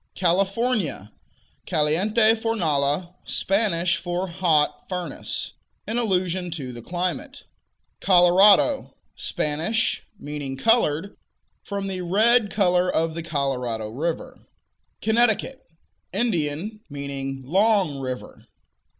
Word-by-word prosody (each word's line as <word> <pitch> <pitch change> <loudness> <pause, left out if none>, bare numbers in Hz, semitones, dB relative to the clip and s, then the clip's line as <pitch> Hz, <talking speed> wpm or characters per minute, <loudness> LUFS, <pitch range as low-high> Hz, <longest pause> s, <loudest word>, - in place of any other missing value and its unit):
California 190 - 0 0.6
Caliente 210 +9 +3
Fornala, 175 -7 0
Spanish 185 -3 +1
for 175 +2 -3
"hot 170 -4 +1
furnace," 180 -5 -4 0.4
in 225 +3 -1
allusion 185 -4 0
to 140 -7 -5
the 120 - -7
climate. 175 +2 -4 0.6
Colorado 190 - +5 0.2
Spanish; 160 +10 -1 0.2
meaning 145 -4 -6
"colored," 200 - +2 0.5
from 200 -2 -4
the 190 -2 -4
red 215 +5 +3
color 180 -3 +2
of 160 0 0
the 165 - -4
Colorado 130 -8 -2
river. 160 +9 -4 0.6
Connecticut 240 +4 +1 0.5
Indian; 195 -1 -1
meaning 135 -1 -5
"long 190 - +2
river." 130 -1 -7
180 Hz, 90 wpm, -24 LUFS, 150-205 Hz, 0.6 s, Colorado